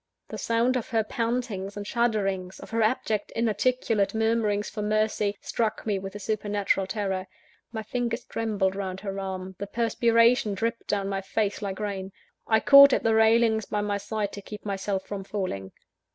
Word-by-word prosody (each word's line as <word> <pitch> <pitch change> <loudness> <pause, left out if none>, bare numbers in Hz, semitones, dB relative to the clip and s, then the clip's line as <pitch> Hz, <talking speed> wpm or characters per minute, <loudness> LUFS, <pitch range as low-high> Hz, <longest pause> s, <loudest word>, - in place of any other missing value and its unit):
The - - -6
sound 230 +3 +1
of 235 - -5
her 225 -3 +2
pantings 225 -4 -2
and 205 - -5
shudderings, 195 -5 -1
of - - -11
her 230 0 +1
abject 215 -2 0
inarticulate 225 -1 +1
murmurings 220 -2 +1
for 215 - -5
mercy, 210 -1 0
struck 220 -2 -2
me 205 -3 0
with 195 +1 -7
a - - -5
supernatural 205 -2 0
terror. 190 -2 -2 0.4
My 220 -1 -4
fingers 240 +1 -2
trembled 205 -4 -1
round 190 -1 -4
her 195 -1 -4
arm, 190 -1 -5
the 200 - -4
perspiration 230 0 +3
dripped 230 +3 -2
down 200 -1 0
my 195 -1 -2
face, 205 +1 -1
like 195 -1 -4
rain; 195 -2 -4 0.4
I 220 -1 +3
caught 280 -1 +9
at - - +1
the 225 - +3
railings 220 0 +4
by 210 - -2
my 205 -1 -1
side, 205 0 -3
to 200 - -8
keep 210 +2 -10
myself 195 -1 -2
from 200 -1 -5
falling. 185 - -4
210 Hz, 175 wpm, -26 LUFS, 195-225 Hz, 0.4 s, caught